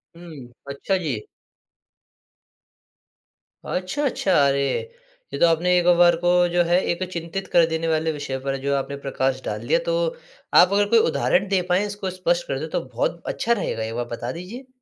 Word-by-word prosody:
हुँ। 165 -7 -11 0.2
अच्छा 140 +8 -1
जी। 140 -12 -4 2.4
अच्छा, 185 +11 -3
अच्छा 200 -7 -1 0.2
अरे! 140 0 +1 0.7
ये - - -3
तो - - +6
आपने 175 +2 +2
एक 175 - +1
बार 175 -1 +6
को 175 +1 +1 0.2
जो 175 0 +2
है 175 +1 +3
एक 175 +2 -2
चिंतित 170 +3 -5
कर 170 -1 +6
देने 160 0 -2
वाले 160 0 +1
विषय 145 -3 -4
पर 135 +1 -3
जो 140 0 0
आपने 140 +1 -3
प्रकाश 130 -1 -1
डाल - - -5
दिया, - - +3
तो - - 0 0.4
आप 185 +2 +6
अगर 205 0 +3
कोई 230 +1 +5
उदाहरण 190 +4 +1
दे 190 -2 +2
पाएँ, 185 +3 +2
इसको 205 -2 -4
स्पष्ट 175 -1 -1
कर 135 - -2
दे, 160 - -4
तो - - -2
बहुत 170 +8 -1
अच्छा 235 - -2
रहेगा, 155 - -3
एक 110 +1 -4
बार 120 0 -2
बता - - -5
दीजिए? 215 +10 -9
175 Hz, 180 wpm, -23 LUFS, 140-190 Hz, 2.4 s, तो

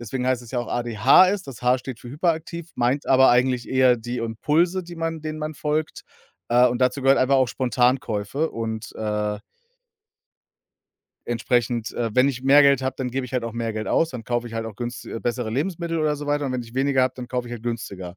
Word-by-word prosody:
Deswegen 125 +2 -4
heißt 130 -1 +1
es 115 - -12
ja 125 - -2
auch 120 - -3
ADHS. 120 - +4
Das 130 -3 -10
H 125 +1 +3
steht 125 -2 -8
für 120 - -10
hyperaktiv, 165 +2 -2
meint 125 +4 0
aber 130 -1 +6
eigentlich 125 0 +2
eher 130 -2 +4
die 120 +2 -5
Impulse, 150 - 0
die 175 -1 -10
man 165 -1 -3
denen 155 0 -5
man 155 0 -4
folgt. 150 +1 -2 0.5
Äh, 125 +1 +5
und 125 +1 -3
dazu 125 +2 +1
gehört 135 +1 +5
einfach 135 +2 +3
auch 130 -1 +3
Spontankäufe 125 +2 0
und, 110 -1 -5
äh 105 -1 -2 1.9
entsprechend, 120 -1 0
äh, 115 -2 -2
wenn 130 +2 +5
ich 130 -2 -4
mehr 140 +2 +6
Geld 140 -2 +4
habe, 130 0 -2
dann 125 -2 -2
gebe 130 +1 -2
ich 125 - -10
halt 125 -2 -1
auch 115 - -4
mehr 115 -1 -3
Geld 110 -1 -4
aus. 165 - +2
Dann 120 -4 -7
kaufe 120 0 -2
ich 115 - -9
halt 115 0 -3
auch 105 -3 -9
günsti 120 -1 -6
äh, 115 - -5
bessere 120 -2 -2
Lebensmittel 165 +5 -2
oder 150 -1 +1
so 145 0 -7
weiter 145 0 0
und 130 - -2
wenn 125 -1 -2
ich 115 0 -14
weniger 135 0 +2
habe, 130 0 0
dann 125 -1 -7
kaufe 125 -1 -3
ich - - -8
halt 115 -2 -7
günstiger. 100 -6 -5
125 Hz, 225 wpm, -23 LUFS, 120-140 Hz, 1.9 s, aber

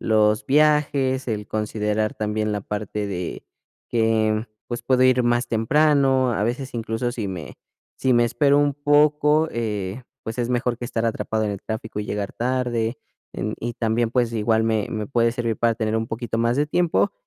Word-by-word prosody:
los 105 -1 +2
viajes, 140 -3 +2
el 105 -2 -3
considerar 105 0 -1
también 105 0 -1
la 105 -1 -2
parte 105 0 -4
de 90 -3 -5 0.4
que, 110 -1 +1 0.2
pues, 120 - -5
puedo 130 -1 +2
ir 130 -1 +4
más 120 0 +1
temprano, 135 +2 +3
a 105 - -1
veces 125 +4 -2
incluso 115 +1 -2
si 110 -5 -3
me 85 -6 -7 0.4
si 130 -2 +2
me 120 0 +4
espero 140 +4 +3
un 145 0 +3
poco, 150 +2 +3
eh, 105 -1 -3 0.2
pues 110 +2 -6
es 120 -1 0
mejor 125 -1 0
que 120 - -4
estar 115 -2 -2
atrapado 110 -1 -1
en 105 - -1
el 100 -1 -5
tráfico 110 -1 -5
y 105 - -5
llegar 100 -1 -3
tarde, 120 -2 -1 0.4
em 105 +2 -3
y 120 0 -3
también, 115 0 0
pues, 120 -1 +1
igual 110 0 +2
me 110 -2 0
me 110 -2 -3
puede 115 -3 +2
servir 115 -2 -2
para 115 -1 +2
tener 110 -1 -1
un 110 - -3
poquito 115 0 -3
más 115 +1 +1
de 145 +1 +2
tiempo 175 +2 +1
115 Hz, 185 wpm, -23 LUFS, 110-130 Hz, 0.4 s, ir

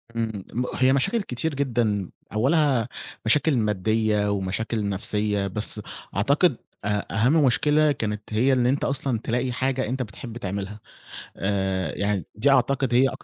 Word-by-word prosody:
إمم، 110 -4 -2
م 125 +2 -1
هي 130 +1 +4
مشاكل 175 - +1
كتير 160 -1 -3
جدًا 115 -8 0 0.2
أوّلها 130 0 +2 0.4
مشاكل 145 +5 +3
ماديّة 105 0 +1
ومشاكل 100 +2 -2
نَفْسيّة، 105 +1 0
بس 105 +2 0 0.3
أعتقد 140 - +3 0.3
أ 105 0 -2
أهَم 130 - +4
مشكلة 150 +4 +3
كانت 105 -6 -2
هي 125 +5 +3
اللي 125 -1 +3
أنت 140 +2 0
أصلًا 135 -4 -1
تلاقي 125 +2 -1
حاجة 130 +1 -1
أنت 130 +3 -2
بتحب 115 +2 -9
تعملها، 100 0 -5 0.6
آآ 95 -4 -1
يعني 100 -4 -1
دي 120 +7 +2
أعتقد 135 -1 +2
هي 130 +2 +5
أك - - -7
115 Hz, 145 wpm, -24 LUFS, 105-135 Hz, 0.6 s, هي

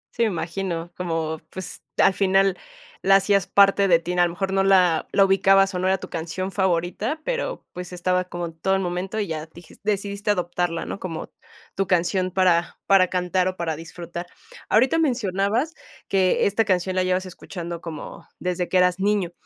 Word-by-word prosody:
Sí, 235 - -2
me 230 - +4
imagino, 170 -1 -4
como, 165 -3 -3
pues, 185 -1 -8 0.2
al - - +5
final 195 0 +3 0.5
la 195 0 +5
hacías 195 -1 +3
parte 200 0 +5
de 170 - +6
ti, 170 +2 -4
a 175 0 +3
lo - - -1
mejor 190 +3 -3
no 195 - +3
la 180 -4 +4
la 195 - +5
ubicabas 195 0 +4
o 180 - -2
no 185 - 0
era 190 - +3
tu - - -9
canción 170 +3 -4
favorita, 190 - -1
pero, - - -3
pues, 180 0 -7
estaba 180 +1 0
como 175 -1 -5
en 165 - -7
todo 190 +2 +1
el 195 - 0
momento 185 +4 -3
y 210 - 0
ya 160 -3 -5
dijiste 160 0 -16
decidiste 200 +1 -2
adoptarla, 175 -3 -1
¿no? - - -6
Como 165 -4 -6 0.4
tu 195 -2 0
canción 185 +1 +1
para 180 -2 +2
para 195 -2 +5
cantar 180 0 0
o 185 0 -3
para 165 -2 -2
disfrutar. 170 +2 -8 0.4
Ahorita 260 +9 +3
mencionabas 235 - 0 0.3
que 190 -2 +2
esta 210 +3 +2
canción 185 -2 0
la 185 - +2
llevas 185 +1 0
escuchando 175 -2 -7
como 165 -2 -8
desde 180 -1 -2
que 185 - +2
eras 180 0 +3
niño, 200 -3 +1
185 Hz, 190 wpm, -23 LUFS, 175-195 Hz, 0.5 s, de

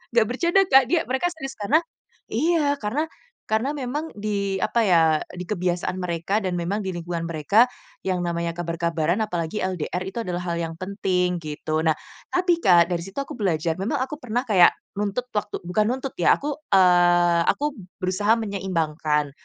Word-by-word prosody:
enggak 230 -2 +5
bercanda 340 +9 +3
Kak, 270 0 +7
dia 335 -1 +3
mereka 260 +8 0
serius 270 -5 -7
karena 240 +10 +3 0.5
iya, 295 +3 +2
karena 260 +10 -1 0.5
karena 245 +7 +1
memang 290 +5 -4
di, 200 -2 -1
apa 235 - +2
ya, 170 -3 +5 0.3
di 180 - -6
kebiasaan 180 -1 -2
mereka 175 +3 -1
dan 185 -2 -2
memang 195 +5 -2
di 190 - -2
lingkungan 170 0 -4
mereka, 170 +9 +4 0.4
yang 185 -2 0
namanya 170 -1 -2
kabar-kabaran 170 +1 -1
apalagi 175 0 -3
LDR 180 -1 -2
itu 215 +5 -4
adalah 180 -2 -3
hal - - -2
yang 165 0 -4
penting, 185 -2 0
gitu. 155 +1 -2
Nah, 160 - +4 0.4
tapi 360 -2 +3
Kak, 175 -1 +6
dari 170 - -1
situ 195 +7 -12
aku 275 - -4
belajar, 165 -5 0
memang 200 - 0
aku 280 +3 -3
pernah 245 +1 -1
kayak 185 -5 +7 0.3
nuntut 210 +5 -2
waktu 210 0 -3
bukan 210 +4 +1
nuntut 265 +1 -3
ya, 175 - +5
aku, 290 0 -3 0.2
eee, 175 -2 +5
aku 295 -3 0 0.2
berusaha 195 +4 +2
menyeimbangkan. 160 -8 -1
190 Hz, 165 wpm, -24 LUFS, 170-240 Hz, 0.5 s, Kak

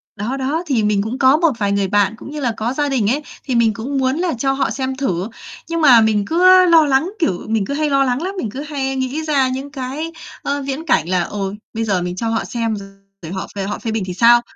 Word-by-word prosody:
Đó, 230 +7 -3
đó, 290 +6 -1
thì 240 -7 +1
mình 210 -1 +2
cũng 225 +5 -3
có 265 +3 +5
một 330 -2 +3
vài 200 -1 +1
người 200 -1 +1
bạn, 205 +1 +2
cũng 280 - -10
như 300 - -5
là 245 -4 0
có 235 +4 -1
gia 290 0 0
đình 235 -7 +1
ấy, 290 +5 0 0.2
thì 255 -3 -2
mình 225 -2 +3
cũng 265 +6 -4
muốn 260 +1 +1
là 350 -3 0
cho 270 +3 +1
họ 270 0 0
xem 265 -1 -3
thử, 195 -8 -2 0.4
nhưng 335 0 -1
mà 250 -6 +7
mình 215 -2 +2
cứ 370 - +6
lo 330 -3 +6
lắng, 285 +7 +1
kiểu, 185 - -1
mình 220 -3 0
cứ 280 - -4
hay 300 +1 0
lo 275 -1 +3
lắng 255 +2 0
lắm, 385 +3 -4
mình 225 - -2
cứ 270 - -6
hay 270 -3 -3
nghĩ 265 +4 -2
ra 280 -4 +2
những 270 +2 -5
cái, 285 +4 -5 0.3
ơ, 285 0 -2
viễn 280 +4 -4
cảnh 175 - +1
là 180 -1 +2
"Ôi, 200 0 -4 0.2
bây 225 0 -2
giờ 195 -5 0
mình 180 0 -3
cho 225 +4 -3
họ 225 - -1
xem 230 -2 -2
rồi 200 -1 -8 0.4
họ 190 - -4
về 195 - -2
họ 205 +2 -4
phê 225 - -3
bình 220 -2 -1
thì 180 - -4
sao?" 235 +5 +6
260 Hz, 270 wpm, -19 LUFS, 215-285 Hz, 0.4 s, mà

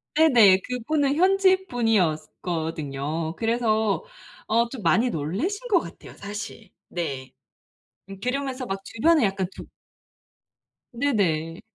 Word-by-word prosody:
네네. 240 -12 +6
그 250 0 -3
분은 290 -3 +2
현지 380 +2 +3
분이었거든요. 160 - -1
그래서 225 - +1 0.4
어 230 +2 +2
좀 255 -2 -7
많이 225 +7 +3
놀라신 240 - -3
것 385 -5 +5
같아요 - - -11
사실. 210 +1 -7 0.2
네. 135 -7 -4 0.9
그러면서 260 0 -2
막 195 -4 -3
주변에 305 +3 +3
약간 195 -1 -1
좀 - - -9 1.3
네네. 190 - 0
220 Hz, 220 characters per minute, -25 LUFS, 170-275 Hz, 1.3 s, 네네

